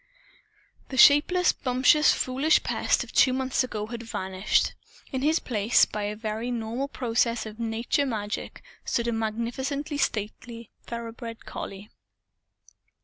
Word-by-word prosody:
The 265 Hz, -, -5 dB
shapeless, 325 Hz, +7 st, +6 dB
bumptious, 260 Hz, +4 st, +3 dB
foolish 270 Hz, +5 st, +2 dB
Pest -, -, +1 dB
of -, -, -12 dB
two 255 Hz, -, +5 dB
months 260 Hz, 0 st, 0 dB
ago 215 Hz, -4 st, -4 dB
had 235 Hz, +1 st, -7 dB
vanished. 190 Hz, -3 st, 0 dB, 0.4 s
In 265 Hz, -2 st, -2 dB
his 310 Hz, +4 st, +3 dB
place, 220 Hz, -5 st, +3 dB
by 210 Hz, -1 st, -4 dB
a 210 Hz, +1 st, -3 dB
very 220 Hz, +2 st, -4 dB
normal 240 Hz, +3 st, -3 dB
process 235 Hz, -3 st, 0 dB
of 215 Hz, +1 st, -9 dB
nature 230 Hz, +5 st, 0 dB
magic, 210 Hz, -4 st, -4 dB, 0.2 s
stood 235 Hz, 0 st, -1 dB
a -, -, +1 dB
magnificently 240 Hz, +7 st, -3 dB
stately 230 Hz, 0 st, -3 dB, 0.2 s
thoroughbred 230 Hz, -1 st, -7 dB
collie. 195 Hz, +2 st, -8 dB
235 Hz, 130 wpm, -26 LUFS, 220-265 Hz, 0.4 s, shapeless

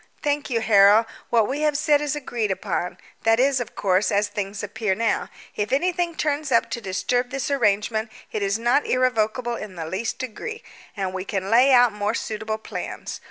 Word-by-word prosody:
"Thank 290 Hz, 0 st, 0 dB
you, 230 Hz, -3 st, 0 dB
Harold. 210 Hz, 0 st, +6 dB, 0.2 s
What 225 Hz, -3 st, +3 dB
we 275 Hz, +3 st, -2 dB
have 300 Hz, -2 st, +2 dB
said 300 Hz, -1 st, +3 dB
is 295 Hz, 0 st, -1 dB
agreed 240 Hz, -7 st, -2 dB
upon 185 Hz, -2 st, -2 dB, 0.2 s
that 225 Hz, +1 st, +3 dB
is, 265 Hz, 0 st, +3 dB
of 245 Hz, -, -6 dB
course, 190 Hz, +1 st, +1 dB
as 205 Hz, +1 st, +2 dB
things 205 Hz, 0 st, -4 dB
appear 210 Hz, -1 st, -1 dB
now: 225 Hz, +1 st, 0 dB, 0.3 s
if 210 Hz, 0 st, -2 dB
anything 345 Hz, +3 st, 0 dB
turns 300 Hz, -2 st, -1 dB
up 230 Hz, -, +3 dB
to 235 Hz, -, -3 dB
disturb 245 Hz, +5 st, -1 dB
this 275 Hz, +2 st, -3 dB
arrangement 220 Hz, -3 st, +1 dB, 0.2 s
it 215 Hz, -, -3 dB
is 200 Hz, +1 st, +1 dB
not 240 Hz, +5 st, +2 dB
irrevocable 240 Hz, -1 st, +1 dB
in 210 Hz, -4 st, -7 dB
the 165 Hz, -2 st, -5 dB
least 190 Hz, +8 st, -3 dB
degree, 285 Hz, -, -6 dB, 0.3 s
and 190 Hz, -2 st, -2 dB
we 185 Hz, 0 st, -3 dB
can 195 Hz, 0 st, -3 dB
lay 250 Hz, +4 st, +6 dB
out 245 Hz, -3 st, +6 dB
more 210 Hz, +2 st, -1 dB
suitable 220 Hz, 0 st, -3 dB
plans. 220 Hz, -, -6 dB
225 Hz, 190 wpm, -23 LUFS, 205-265 Hz, 0.3 s, Harold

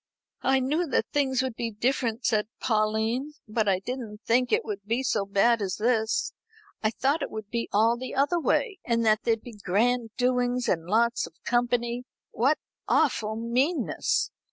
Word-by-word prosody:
"I 265 Hz, 0 st, +3 dB
knew 300 Hz, +7 st, 0 dB
that -, -, +1 dB
things 265 Hz, -3 st, +2 dB
would 260 Hz, -2 st, -2 dB
be 230 Hz, 0 st, -2 dB
different," 230 Hz, +1 st, -1 dB
said 210 Hz, -2 st, +2 dB
Pauline, 220 Hz, +5 st, 0 dB
"but 215 Hz, 0 st, 0 dB
I 190 Hz, -2 st, +3 dB
didn't 220 Hz, 0 st, -6 dB
think 245 Hz, +1 st, +2 dB
it -, -, +2 dB
would 210 Hz, -2 st, -4 dB
be 230 Hz, +5 st, -1 dB
so 210 Hz, -5 st, 0 dB
bad 215 Hz, +3 st, +3 dB
as 190 Hz, -3 st, -1 dB
this. 220 Hz, 0 st, +1 dB, 0.5 s
I 215 Hz, -, +2 dB
thought 275 Hz, +7 st, 0 dB
it -, -, -2 dB
would 215 Hz, -1 st, -7 dB
be 235 Hz, -1 st, -2 dB
all 225 Hz, +3 st, +3 dB
the 255 Hz, +2 st, -6 dB
other 285 Hz, +6 st, +2 dB
way, 385 Hz, -, 0 dB
and 230 Hz, -1 st, +1 dB
that 215 Hz, 0 st, +4 dB
there'd 225 Hz, -2 st, +1 dB
be 240 Hz, -, -9 dB
grand 230 Hz, +5 st, +1 dB
doings 250 Hz, 0 st, +1 dB
and 165 Hz, -5 st, 0 dB
lots 235 Hz, +1 st, +2 dB
of 165 Hz, -, -17 dB
company. 240 Hz, 0 st, 0 dB, 0.3 s
What 270 Hz, +7 st, +2 dB, 0.3 s
awful 215 Hz, 0 st, +2 dB
meanness! 250 Hz, +9 st, 0 dB
235 Hz, 175 wpm, -27 LUFS, 215-255 Hz, 0.5 s, that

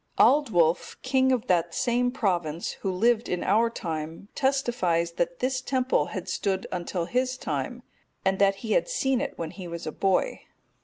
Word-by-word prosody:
Aldwulf,(245) 185 Hz, -, +3 dB
king 260 Hz, 0 st, +3 dB
of 250 Hz, -2 st, +1 dB
that 170 Hz, -4 st, +1 dB
same 245 Hz, +1 st, +1 dB
province, 175 Hz, -, -1 dB
who 195 Hz, -, -1 dB
lived 225 Hz, +5 st, +2 dB
in 180 Hz, -, -1 dB
our 230 Hz, +2 st, +3 dB
time, 165 Hz, -2 st, -5 dB
testifies 240 Hz, -11 st, +1 dB
that 170 Hz, 0 st, -2 dB
this 255 Hz, 0 st, 0 dB
temple 260 Hz, -1 st, +1 dB
had -, -, -6 dB
stood 190 Hz, -1 st, -1 dB
until 175 Hz, -1 st, -2 dB
his 255 Hz, +5 st, 0 dB
time, -, -, -4 dB, 0.4 s
and 190 Hz, 0 st, +2 dB
that 195 Hz, 0 st, +4 dB
he 220 Hz, -, -3 dB
had -, -, +2 dB
seen 270 Hz, -, +1 dB
it -, -, -4 dB
when 160 Hz, -1 st, -4 dB
he 185 Hz, -3 st, -8 dB
was 170 Hz, 0 st, -6 dB
a 155 Hz, -, -3 dB
boy. 195 Hz, -, 0 dB
200 Hz, 170 wpm, -27 LUFS, 175-255 Hz, 0.4 s, that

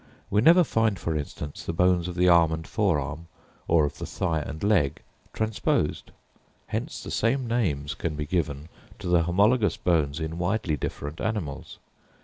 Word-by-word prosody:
We 105 Hz, -, +3 dB
never 170 Hz, +7 st, +7 dB
find, 115 Hz, -, +1 dB
for 80 Hz, -3 st, -2 dB
instance, 75 Hz, 0 st, -5 dB
the 85 Hz, -, -3 dB
bones 90 Hz, 0 st, +2 dB
of 90 Hz, -, -5 dB
the 90 Hz, 0 st, +3 dB
arm 85 Hz, -2 st, +6 dB
and 80 Hz, 0 st, -4 dB
forearm, 80 Hz, -, -1 dB, 0.4 s
or 80 Hz, -2 st, +4 dB
of 70 Hz, -, -5 dB
the -, -, -5 dB
thigh 80 Hz, -2 st, -1 dB
and 75 Hz, +1 st, -6 dB
leg, 85 Hz, -9 st, +2 dB, 0.3 s
transposed. 110 Hz, -2 st, -1 dB, 0.6 s
Hence -, -, -4 dB
the -, -, -7 dB
same 125 Hz, +3 st, +1 dB
names 80 Hz, -12 st, -1 dB
can 80 Hz, -1 st, -3 dB
be 75 Hz, 0 st, -3 dB
given 75 Hz, -2 st, -2 dB, 0.3 s
to -, -, -10 dB
the 90 Hz, -1 st, +4 dB
homologous 100 Hz, +4 st, +2 dB
bones 80 Hz, -4 st, +1 dB
in 80 Hz, +1 st, -4 dB
widely 90 Hz, -2 st, 0 dB
different 75 Hz, +1 st, -5 dB
animals. 100 Hz, -11 st, -4 dB
85 Hz, 165 wpm, -26 LUFS, 75-105 Hz, 0.6 s, never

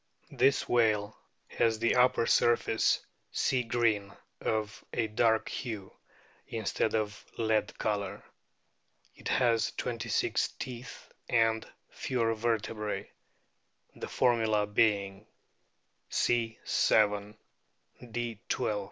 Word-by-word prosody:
This 135 Hz, -, +2 dB
whale 110 Hz, -3 st, +2 dB, 0.3 s
has 115 Hz, -1 st, +1 dB
the 115 Hz, +1 st, +2 dB
upper 125 Hz, -2 st, +4 dB
surface 115 Hz, -1 st, +3 dB, 0.3 s
sea 130 Hz, -2 st, +1 dB
green, 115 Hz, -4 st, +1 dB, 0.3 s
of 110 Hz, -2 st, -2 dB
a 115 Hz, -, 0 dB
dark 110 Hz, +1 st, +2 dB
hue, 110 Hz, -7 st, -5 dB, 0.5 s
instead 110 Hz, 0 st, -1 dB
of 105 Hz, -1 st, -2 dB
lead 110 Hz, -2 st, 0 dB
colour. 100 Hz, -3 st, -2 dB, 0.9 s
It -, -, -8 dB
has 115 Hz, -3 st, +2 dB
twenty 115 Hz, -1 st, -4 dB
six -, -, +1 dB
teeth 125 Hz, 0 st, -8 dB, 0.2 s
and 115 Hz, -1 st, +2 dB, 0.2 s
fewer 115 Hz, -3 st, 0 dB
vertebrae, 110 Hz, -1 st, -2 dB, 0.8 s
the -, -, -6 dB
formula 110 Hz, -4 st, +2 dB
being: 105 Hz, -1 st, +1 dB, 0.8 s
C. 115 Hz, -2 st, +1 dB
7; 105 Hz, 0 st, +2 dB, 0.7 s
D. 115 Hz, -2 st, -4 dB
12; -, -, 0 dB
L. 105 Hz, -, -2 dB
110 Hz, 100 wpm, -30 LUFS, 105-115 Hz, 0.9 s, upper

